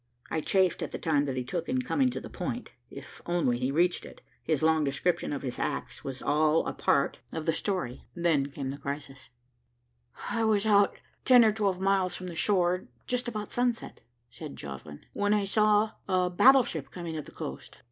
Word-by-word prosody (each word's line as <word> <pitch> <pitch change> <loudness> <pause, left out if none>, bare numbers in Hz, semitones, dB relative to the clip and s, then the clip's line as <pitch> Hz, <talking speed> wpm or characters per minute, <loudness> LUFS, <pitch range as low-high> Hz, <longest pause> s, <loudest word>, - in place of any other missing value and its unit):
I 160 - 0
chafed 190 +2 +2
at - - -2
the - - -4
time 150 -4 +1
that 135 -2 -3
he 125 - -1
took 165 +6 -4
in 255 0 0
coming 260 0 +2
to 250 - -4
the - - -9
point. - - -5 0.2
If - - -11
he - - -6
only 130 -7 +1
reached 175 +4 +2
it, - - -12 0.2
his 155 -2 0
long 160 -1 +4
description 145 +5 0
of 140 -1 -4
his 125 -2 -4
acts - - -3
was 135 -1 -6
all 155 +2 +3
a - - -2
part - - +1
of 160 -1 -4
the 165 - +2
story. 180 - -3
Then 165 -5 +2
came 140 -1 -5
the 140 - -8
crisis: 140 -1 -6 1.0
"I 230 - 0
was 215 -1 +2
out 205 -2 +4 0.3
ten 245 -3 +7
or 215 - +5
twelve 200 -4 0
miles 190 -2 +1
from 180 -1 -6
shore, 180 0 +1 0.2
just 250 0 -1
about 215 -3 -4
sunset," 245 -1 -1 0.3
said 155 -3 -8
Joslinn, 70 +1 -9
"when 205 +1 +2
I 205 -1 +1
saw 210 +1 +3 0.2
a 180 -1 +2
battleship 240 - +4
coming 170 -3 -6
up 155 - -5
the - - -12
coast. - - -7
175 Hz, 195 wpm, -29 LUFS, 145-205 Hz, 1.0 s, ten